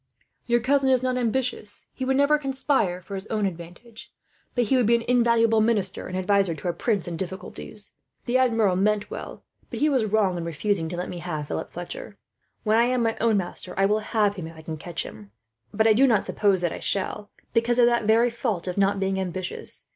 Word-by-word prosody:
"'Your 240 Hz, 0 st, +3 dB
cousin 270 Hz, +2 st, +2 dB
is 255 Hz, -1 st, +3 dB
not 255 Hz, 0 st, 0 dB
ambitious. 245 Hz, -3 st, -2 dB
He 260 Hz, -, -4 dB
would 265 Hz, 0 st, +1 dB
never 290 Hz, +2 st, +4 dB
conspire 265 Hz, -10 st, 0 dB
for 200 Hz, -, -10 dB
his 195 Hz, +1 st, -5 dB
own 215 Hz, -2 st, -1 dB
advantage, 180 Hz, +6 st, -8 dB, 0.4 s
but 245 Hz, -, +3 dB
he 250 Hz, +4 st, +1 dB
would 250 Hz, -4 st, +3 dB
be 235 Hz, -, +5 dB
an 235 Hz, -, -1 dB
invaluable 235 Hz, -2 st, +3 dB
minister 210 Hz, -4 st, 0 dB
and 185 Hz, -, -4 dB
adviser, 190 Hz, -2 st, +2 dB
to 180 Hz, -, -6 dB
a -, -, -1 dB
prince 205 Hz, -4 st, -1 dB
in 170 Hz, -1 st, -4 dB
difficulties. 190 Hz, +3 st, -4 dB, 0.3 s
The 255 Hz, +1 st, +2 dB
Admiral 225 Hz, -7 st, +3 dB
meant 205 Hz, +2 st, +1 dB
well, -, -, -7 dB, 0.3 s
but -, -, -6 dB
he 305 Hz, -, +3 dB
was 260 Hz, -6 st, +2 dB
wrong 205 Hz, -4 st, +1 dB
in -, -, -4 dB
refusing 170 Hz, +1 st, -1 dB
to 175 Hz, -, -5 dB
let 180 Hz, -, -3 dB
me 175 Hz, -, -6 dB
have 155 Hz, -4 st, -5 dB
Philip -, -, -4 dB
Fletcher. -, -, -7 dB, 0.5 s
When 220 Hz, +1 st, +3 dB
I 235 Hz, -, +5 dB
am 250 Hz, -1 st, +1 dB
my 225 Hz, -1 st, +1 dB
own 225 Hz, -2 st, +3 dB
master 180 Hz, -1 st, -4 dB
I 195 Hz, -, +4 dB
will 210 Hz, +2 st, +2 dB
have 210 Hz, -2 st, 0 dB
him, 165 Hz, -3 st, -5 dB
if 165 Hz, 0 st, -12 dB
I 160 Hz, -, -11 dB
can 160 Hz, 0 st, -5 dB
catch 165 Hz, +2 st, -4 dB
him; 105 Hz, -2 st, -11 dB, 0.4 s
but 220 Hz, +1 st, +1 dB
I 220 Hz, -, +6 dB
do 265 Hz, +5 st, +5 dB
not 225 Hz, -5 st, +3 dB
suppose 200 Hz, -3 st, +1 dB
that 175 Hz, -2 st, 0 dB
I -, -, -6 dB
shall, 205 Hz, +1 st, -1 dB, 0.2 s
because 230 Hz, +1 st, +2 dB
of 245 Hz, -, +6 dB
that 235 Hz, -2 st, +2 dB
very 230 Hz, +3 st, +4 dB
fault 225 Hz, -7 st, -2 dB
of 180 Hz, +2 st, -2 dB
not 200 Hz, 0 st, +2 dB
being 195 Hz, 0 st, 0 dB
ambitious. 185 Hz, -1 st, -2 dB
210 Hz, 225 wpm, -25 LUFS, 185-240 Hz, 0.5 s, I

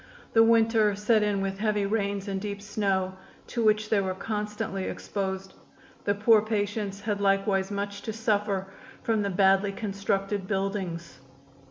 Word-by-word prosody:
The 225 Hz, -, +6 dB
winter 225 Hz, -2 st, +4 dB
set 210 Hz, +2 st, +3 dB
in 205 Hz, -2 st, +1 dB
with 195 Hz, 0 st, -3 dB
heavy 210 Hz, -2 st, +1 dB
rains 200 Hz, -1 st, -1 dB
and 195 Hz, -1 st, -2 dB
deep 200 Hz, -1 st, -4 dB
snow, 195 Hz, -2 st, -1 dB, 0.3 s
to 235 Hz, -, -2 dB
which 215 Hz, 0 st, +3 dB
they 210 Hz, -2 st, +4 dB
were 190 Hz, -1 st, -2 dB
constantly 210 Hz, -1 st, -3 dB
exposed. 190 Hz, -1 st, -4 dB, 0.5 s
The 205 Hz, -, +2 dB
poor 215 Hz, +1 st, +5 dB
patients 205 Hz, -2 st, -2 dB
had 205 Hz, -2 st, -2 dB
likewise 195 Hz, -1 st, +2 dB
much 200 Hz, 0 st, -4 dB
to 220 Hz, -, -4 dB
suffer 210 Hz, -3 st, 0 dB, 0.4 s
from 225 Hz, -2 st, +1 dB
the 200 Hz, -, 0 dB
badly 195 Hz, +1 st, +3 dB
constructed 195 Hz, -1 st, -2 dB
buildings. 190 Hz, -7 st, -3 dB
200 Hz, 150 wpm, -27 LUFS, 195-210 Hz, 0.5 s, The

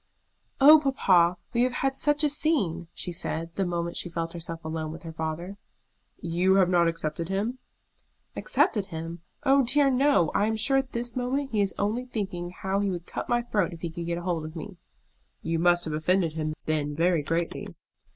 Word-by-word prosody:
"Oh, 300 Hz, +3 st, +9 dB
papa, 185 Hz, -, +3 dB, 0.2 s
we 235 Hz, -, +2 dB
have 250 Hz, 0 st, +2 dB
had 270 Hz, 0 st, +1 dB
such 295 Hz, +2 st, +1 dB
a 300 Hz, -, +4 dB
scene!" 200 Hz, -, +1 dB
she 175 Hz, -, -6 dB
said, 165 Hz, -1 st, -3 dB
the 195 Hz, -2 st, 0 dB
moment 170 Hz, -1 st, -2 dB
she 175 Hz, -, -3 dB
felt 165 Hz, 0 st, -3 dB
herself 165 Hz, -1 st, -7 dB
alone 160 Hz, -1 st, -3 dB
with 165 Hz, +3 st, -9 dB
her 165 Hz, -1 st, -7 dB
father. 160 Hz, +5 st, -4 dB, 0.6 s
"You 175 Hz, +3 st, +2 dB
have 190 Hz, -2 st, +4 dB
not 170 Hz, -1 st, +4 dB
accepted 165 Hz, 0 st, -3 dB
him?" 215 Hz, +7 st, -2 dB, 0.8 s
"Accepted 215 Hz, -, +1 dB
him! 165 Hz, +1 st, -6 dB, 0.2 s
Oh 275 Hz, -1 st, +5 dB
dear 275 Hz, +3 st, +3 dB
no! 260 Hz, -, +3 dB
I 205 Hz, -, +2 dB
am 220 Hz, -, 0 dB
sure 270 Hz, +5 st, +2 dB
at 265 Hz, -1 st, -1 dB
this 235 Hz, 0 st, -3 dB
moment 265 Hz, +3 st, -1 dB
he 215 Hz, -2 st, +1 dB
is 195 Hz, -1 st, -1 dB
only 220 Hz, +5 st, -1 dB
thinking 195 Hz, -8 st, -4 dB
how 190 Hz, +2 st, -2 dB
he 200 Hz, -1 st, 0 dB
would 175 Hz, -2 st, -4 dB
cut -, -, -5 dB
my 240 Hz, 0 st, +2 dB
throat 205 Hz, -7 st, 0 dB
if 165 Hz, -, -11 dB
he 170 Hz, -, -3 dB
could 170 Hz, 0 st, -6 dB
get 170 Hz, 0 st, -1 dB
hold 175 Hz, -2 st, -2 dB
of 155 Hz, +2 st, -8 dB
me." 185 Hz, +3 st, -8 dB, 0.7 s
"You 165 Hz, 0 st, -1 dB
must 175 Hz, 0 st, +3 dB
have 155 Hz, -, -3 dB
offended 165 Hz, +1 st, +1 dB
him 155 Hz, -1 st, -3 dB
then 150 Hz, -2 st, -1 dB
very 170 Hz, 0 st, +2 dB
greatly." 165 Hz, +3 st, -2 dB
180 Hz, 200 wpm, -27 LUFS, 165-235 Hz, 0.8 s, Oh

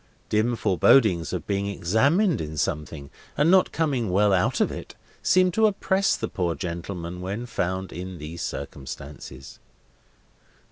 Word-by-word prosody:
Dim 110 Hz, +3 st, +2 dB
forebodings 95 Hz, -2 st, +3 dB
of 90 Hz, -4 st, -4 dB
being 100 Hz, 0 st, -1 dB
examined 130 Hz, -, +2 dB
in 80 Hz, 0 st, -6 dB
something, 75 Hz, -1 st, -3 dB, 0.3 s
and 150 Hz, +4 st, +4 dB
not 190 Hz, -1 st, +5 dB
coming 140 Hz, -9 st, 0 dB
well 100 Hz, +2 st, +3 dB
out 100 Hz, +7 st, +1 dB
of -, -, +2 dB
it, -, -, -8 dB, 0.3 s
seemed 185 Hz, 0 st, +3 dB
to 220 Hz, +2 st, +4 dB
oppress 195 Hz, -1 st, +1 dB
the -, -, -3 dB
poor 85 Hz, -3 st, -2 dB
gentleman 85 Hz, 0 st, -5 dB
when 100 Hz, +6 st, -4 dB
found 95 Hz, -5 st, -3 dB
in 90 Hz, 0 st, -6 dB
these 80 Hz, +2 st, -7 dB
circumstances. 70 Hz, -1 st, -7 dB
95 Hz, 140 wpm, -25 LUFS, 85-130 Hz, 0.3 s, not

